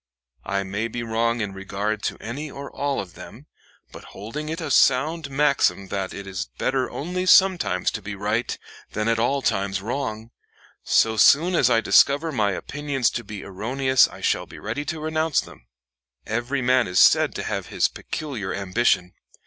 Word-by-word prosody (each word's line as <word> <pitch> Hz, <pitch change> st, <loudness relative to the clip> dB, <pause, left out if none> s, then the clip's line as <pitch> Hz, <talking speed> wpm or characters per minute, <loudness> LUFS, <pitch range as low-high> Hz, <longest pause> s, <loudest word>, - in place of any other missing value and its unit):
I 100 Hz, 0 st, 0 dB
may 100 Hz, +4 st, -3 dB
be 120 Hz, +1 st, -5 dB
wrong 115 Hz, +1 st, 0 dB
in 100 Hz, -2 st, -3 dB
regard 100 Hz, +2 st, -3 dB
to -, -, -2 dB
any 140 Hz, +7 st, -6 dB
or 140 Hz, +1 st, -8 dB
all 140 Hz, -1 st, -1 dB
of 90 Hz, -4 st, -7 dB
them; -, -, -12 dB, 0.5 s
but -, -, -11 dB
holding 145 Hz, +10 st, -6 dB
it 165 Hz, +2 st, -4 dB
a 160 Hz, -, -4 dB
sound 150 Hz, +4 st, +3 dB
maxim 135 Hz, -10 st, +1 dB
that 95 Hz, -1 st, -3 dB
it 100 Hz, -, -8 dB
is 95 Hz, -9 st, -5 dB
better 130 Hz, -1 st, 0 dB
only 180 Hz, +4 st, -3 dB
sometimes 180 Hz, -, +4 dB
to 110 Hz, -, -5 dB
be 100 Hz, +1 st, -6 dB
right 105 Hz, +4 st, -1 dB, 0.4 s
than 110 Hz, +1 st, -1 dB
at 115 Hz, -1 st, +2 dB
all 135 Hz, +4 st, +1 dB
times 95 Hz, 0 st, 0 dB
wrong, 110 Hz, 0 st, -4 dB, 0.5 s
so 110 Hz, 0 st, +3 dB
soon 160 Hz, +11 st, +5 dB
as 140 Hz, -8 st, +4 dB
I 115 Hz, -2 st, +3 dB
discover 140 Hz, +10 st, +4 dB
my 105 Hz, -7 st, +1 dB
opinions 140 Hz, +3 st, -1 dB
to 120 Hz, -, -4 dB
be 105 Hz, -2 st, -8 dB
erroneous 130 Hz, +7 st, +2 dB
I -, -, -13 dB
shall -, -, 0 dB
be -, -, -12 dB
ready 115 Hz, +8 st, -4 dB
to 160 Hz, +2 st, -4 dB
renounce 155 Hz, -1 st, 0 dB
them.... -, -, -9 dB, 0.6 s
Every 120 Hz, +5 st, -2 dB
man 125 Hz, 0 st, +3 dB
is 90 Hz, 0 st, -3 dB
said -, -, +5 dB
to -, -, -3 dB
have -, -, -3 dB
his -, -, +1 dB
peculiar 125 Hz, -11 st, -5 dB
ambition. 95 Hz, -2 st, +1 dB
115 Hz, 180 wpm, -23 LUFS, 100-140 Hz, 0.6 s, soon